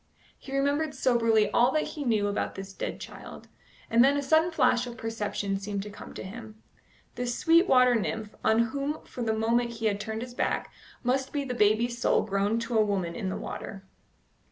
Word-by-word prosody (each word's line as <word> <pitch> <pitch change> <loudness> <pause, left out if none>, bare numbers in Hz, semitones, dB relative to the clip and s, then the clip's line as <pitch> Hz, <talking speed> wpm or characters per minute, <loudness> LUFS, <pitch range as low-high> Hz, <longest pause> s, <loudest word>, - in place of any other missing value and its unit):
He 275 0 -4
remembered 285 +2 0
soberly 230 -5 +3
all 240 +4 +4
that 310 - +2
he 300 - -5
knew 220 -5 +1
about 205 - -2
this 195 0 -8
dead - - -5
child, - - -10 0.4
and 230 +1 +5
then 280 +2 +4
a 285 - -1
sudden 315 +4 +3
flash 250 -6 +2
of 240 -1 -8
perception 210 -3 -2
seemed 200 0 -4
to 210 - -8
come - - -11
to - - -6
him. 215 +2 -9 0.5
This 245 -1 -3
sweet 335 +2 +4
water 250 -1 +5
nymph, 220 -1 -2
on 230 +1 +3
whom 285 +2 -3
for 250 - -8
the 225 -2 +1
moment 235 +2 +1
he 225 -1 -5
had 205 -2 +1
turned 220 +2 -4
his 250 -1 -9
back, - - -2 0.3
must 260 +2 0
be 290 -1 -1
the 260 -2 -4
baby's 235 +2 +2
soul - - +3
grown 200 +2 0
to 230 -1 0
a - - +6
woman 190 -5 -1
in 200 -5 -3
the 185 - -3
water. 195 -1 -7
235 Hz, 205 wpm, -28 LUFS, 210-260 Hz, 0.5 s, a